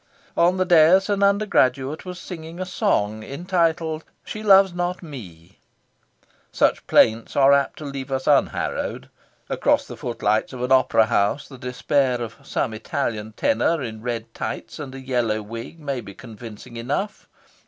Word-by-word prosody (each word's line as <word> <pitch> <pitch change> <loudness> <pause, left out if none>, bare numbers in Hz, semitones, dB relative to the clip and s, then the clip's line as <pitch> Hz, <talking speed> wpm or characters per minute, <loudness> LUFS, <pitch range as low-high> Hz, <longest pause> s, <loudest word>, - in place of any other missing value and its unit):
On 175 +2 +3
the 185 - +2
dais 175 +3 +5
an 200 -1 +1
undergraduate 155 - +2
was 180 -1 -6
singing 165 -1 -8
a 185 - -2
song 110 - 0
entitled 165 - -1 0.2
"She 215 - -7
Loves 195 -3 +6
Not 175 +1 -2
Me." 95 - -11 0.9
Such - - +1
plaints 110 +1 +3
are 140 0 +6
apt 140 0 +1
to 155 - -8
leave 140 -1 -6
us 130 0 -2
unharrowed. - - 0 0.4
Across - - +1
the - - -9
footlights 110 -1 -1
of 125 -1 -5
an 125 - -2
opera 130 -4 +5
house, 105 +5 +1
the 135 -3 -12
despair 130 0 0
of 115 -1 -6
some 135 -3 -2
Italian 110 -3 -3
tenor 170 - +1
in 110 -2 -6
red 115 -1 -4
tights 115 - -5
and 135 -3 -7
a - - -7
yellow 120 -5 -1
wig 115 +9 -8
may 140 -4 -3
be 100 -3 -11
convincing 115 0 -10
enough. 145 - -3
135 Hz, 155 wpm, -23 LUFS, 115-170 Hz, 0.9 s, Loves